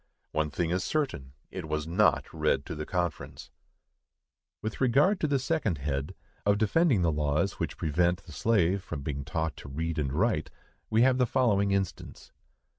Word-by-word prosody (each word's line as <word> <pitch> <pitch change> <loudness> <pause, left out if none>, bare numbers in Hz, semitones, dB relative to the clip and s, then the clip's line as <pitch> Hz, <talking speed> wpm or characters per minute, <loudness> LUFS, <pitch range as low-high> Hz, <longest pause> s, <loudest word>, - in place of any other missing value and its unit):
One 75 0 0
thing 85 +3 -1
is 90 +1 0
certain, 100 - -2 0.2
it 90 -4 -6
was 75 0 -1
not 90 +6 +3
read 70 - +1
to 85 - -5
the 75 -1 -5
conference. 90 -2 -3 1.1
With 110 +3 -5
regard 145 - +4
to 155 - +1
the 145 -1 +2
second 135 - 0
head,—of 70 +8 -2
defending 110 - +3
the 85 - +3
laws 75 +5 0
which - - -3
prevent 85 +4 +1
the 85 - -13
slave 95 +2 +2
from 70 - -6
being 70 -1 -3
taught 80 +2 -2
to 70 - -9
read 80 +3 -2
and 70 -3 -1
write,—we 110 - -1
have 130 0 +4
the 125 - +3
following 110 -6 +2
instance. 100 -2 -3
90 Hz, 165 wpm, -29 LUFS, 75-110 Hz, 1.1 s, regard